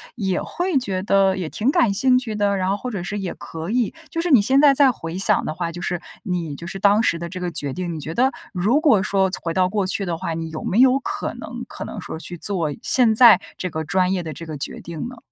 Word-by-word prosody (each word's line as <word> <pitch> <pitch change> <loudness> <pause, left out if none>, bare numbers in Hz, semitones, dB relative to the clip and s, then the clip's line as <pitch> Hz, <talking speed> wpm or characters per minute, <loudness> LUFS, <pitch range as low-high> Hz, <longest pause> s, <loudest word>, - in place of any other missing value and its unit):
也 190 -6 -1
会 355 -3 -1
觉 195 -7 -1
得 195 -1 +3
也 180 -4 -4
挺 230 - 0
感 235 -7 +3
兴 250 +5 +3
趣 230 -4 -5
的， 205 -1 +1
然 185 0 0
后 200 - 0
或 250 +4 -5
者 200 -5 -4
是 185 +4 -4
也 195 -3 -4
可 165 +3 -7
以。 240 -3 +1 0.2
就 330 - -1
是 350 - -1
你 265 -7 +7
现 265 +7 +3
在 285 -2 +6
再 275 -1 +5
回 165 -6 -6
想 200 +2 +2
的 - - -3
话， 170 -1 -3
就 175 +1 -8
是 175 -1 -2 0.2
你 175 -7 -3
就 170 +4 -9
是 195 - -5
当 205 +2 +4
时 170 - +1
的 170 0 -5
这 185 +2 -7
个 180 -1 -2
决 145 -5 -4
定， 180 +1 -4
你 160 - -5
觉 155 +2 -5
得 260 +6 +2 0.2
如 205 +10 +2
果 280 - +4
说 190 0 +1
从 - - -5
回 165 - -2
到 185 -1 +3
过 195 0 -1
去 195 +1 0
的 175 -2 -2
话， 165 -1 -4
你 165 0 -5
有 155 - -6
没 200 - -1
有 260 +1 +5
可 400 +7 -4
能 - - -7
可 - - -7
能 - - -7
说 - - -7
去 175 +1 -6
做 170 -3 +1
现 235 -4 +3
在 225 -5 +8 0.2
这 185 - -3
个 160 0 -3
专 180 +4 +1
业 185 - -1
的 165 -2 -6
这 165 - -8
个 155 -1 -6
决 - - -5
定 170 +4 -6
呢？ 250 - -11
190 Hz, 300 characters per minute, -21 LUFS, 170-230 Hz, 0.2 s, 在